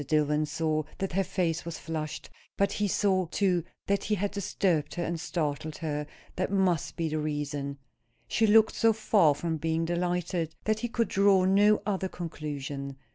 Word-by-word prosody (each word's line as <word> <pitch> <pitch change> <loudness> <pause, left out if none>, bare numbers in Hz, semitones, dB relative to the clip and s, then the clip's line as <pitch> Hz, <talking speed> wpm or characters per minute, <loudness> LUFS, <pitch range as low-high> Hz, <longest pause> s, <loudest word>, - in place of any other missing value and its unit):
Dillwyn 150 +1 +1
saw 155 +1 0 0.2
that 195 - -2
her 195 +2 +2
face 175 -3 -1
was 170 -2 -5
flushed; 155 -2 -5 0.3
but 200 0 +2
he 205 - 0
saw, 190 -2 +2
too, 180 -1 +1 0.2
that 200 0 0
he 215 - +1
had 205 +1 -1
disturbed 180 -6 0
her 175 - -1
and 170 -1 -2
startled 155 -2 -2
her; 150 -2 -3 0.3
that 185 +1 -1
must 190 -5 +1
be 165 - -1
the 155 0 -1
reason. 145 -2 -3 0.5
She 225 - +2
looked 220 +1 +6
so 225 0 +3
far 205 -8 +3
from 160 +2 -2
being 160 +1 0
delighted, 175 -1 -1
that 215 0 +1
he 240 - -2
could 230 -1 0
draw 195 -1 +4
no 205 +2 +4
other 190 -2 -1
conclusion. 145 -5 -5
170 Hz, 175 wpm, -29 LUFS, 155-195 Hz, 0.5 s, looked